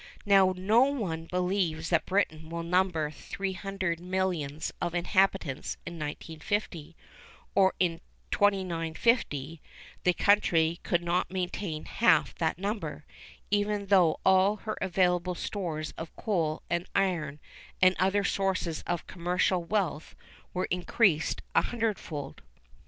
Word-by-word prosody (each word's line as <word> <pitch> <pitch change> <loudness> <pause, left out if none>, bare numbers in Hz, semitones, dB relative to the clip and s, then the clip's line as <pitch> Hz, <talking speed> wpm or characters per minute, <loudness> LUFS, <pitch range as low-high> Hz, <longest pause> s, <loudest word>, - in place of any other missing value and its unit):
Now 195 -2 +5
no 215 +7 +4
one 195 -13 -2
believes 180 -2 -1
that 170 - +2
Britain 160 -5 0
will 170 0 -4
number 170 -3 +1
300 190 0 -3
millions 175 -5 -2
of 175 0 -2
inhabitants 175 -5 +1
in 170 -1 -7
1950, 160 +2 -4 0.6
or 190 -1 +4
in 170 -3 +1 0.3
2950; 165 - +1 0.4
the 180 - +4
country 170 -5 +3
could 175 0 0
not 175 +1 0
maintain 180 -3 -3
half 235 - +3
that 160 -2 0
number, 190 -6 -4 0.5
even 205 0 +1
though 185 -5 +4
all 190 +2 +5
her 215 +1 -5
available 180 -1 +1
stores 165 -6 -4
of 165 0 -7
coal 165 -8 -1
and 175 +1 -1
iron, 165 -7 0 0.4
and 185 0 +5
other 195 +2 +2
sources 190 -5 -1
of 175 -1 -2
commercial 180 0 0
wealth 170 -4 -2 0.4
were 185 +1 -1
increased 180 -2 +1
a - - +5
hundredfold. 200 - -3
180 Hz, 120 wpm, -29 LUFS, 165-195 Hz, 0.6 s, Now